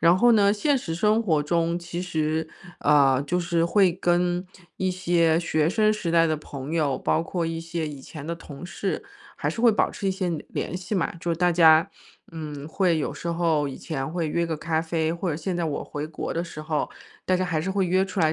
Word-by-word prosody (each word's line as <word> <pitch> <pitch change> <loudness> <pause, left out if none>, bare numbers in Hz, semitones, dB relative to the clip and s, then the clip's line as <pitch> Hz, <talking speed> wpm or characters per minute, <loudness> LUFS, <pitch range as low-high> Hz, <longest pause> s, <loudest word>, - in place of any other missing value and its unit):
然 170 +2 +5
后 240 +5 +5
呢， 205 -3 +5
现 270 +8 +2
实 165 -9 -4
生 210 +6 +2
活 160 -8 +2
中 170 +2 0
其 170 0 -5
实， 160 -3 -1 0.3
呃， 135 -3 +4
就 180 - 0
是 170 -1 +1
会 190 -1 +4
跟 175 0 0 0.3
一 185 0 +1
些 170 -3 +2
学 155 -2 +1
生 215 +2 +3
时 210 -6 -3
代 165 0 +4
的 155 - +1
朋 140 -1 -7
友， 150 -5 +1
包 160 - +1
括 170 0 -2
一 165 0 -3
些 165 -1 -3
以 145 -2 -7
前 150 +2 -9
的 170 - -2
同 165 -1 -10
事， 190 - -3 0.3
还 - - -1
是 230 - -5
会 235 -1 +6
保 210 - +1
持 195 - -3
一 - - +2
些 185 -2 -2 0.2
联 - - -4
系 185 +4 -4
嘛。 180 -3 0
就 175 - -2
是 165 - 0
大 175 0 +3
家， 165 +2 +6 0.4
嗯， 150 -3 -6
会 175 -1 +2
有 - - -2
时 170 - -6
候 165 -4 +1
以 135 - -7
前 135 -4 -4
会 165 -1 -2
约 170 +2 0
个 160 -2 -2
咖 160 +1 -1
啡 160 -1 -1
或 170 +2 -3
者 150 - -2
现 175 +3 -3
在 170 - -1
我 150 -3 -3
回 150 +1 -5
国 155 - -5
的 170 - -1
时 155 -3 -8
候， 155 -1 -1 0.4
大 185 - +3
家 185 - 0
还 165 -4 -1
是 185 +5 -2
会 190 -1 +1
约 185 +2 +3
出 195 0 -6
来 155 -1 +3
170 Hz, 250 characters per minute, -25 LUFS, 155-180 Hz, 0.4 s, 会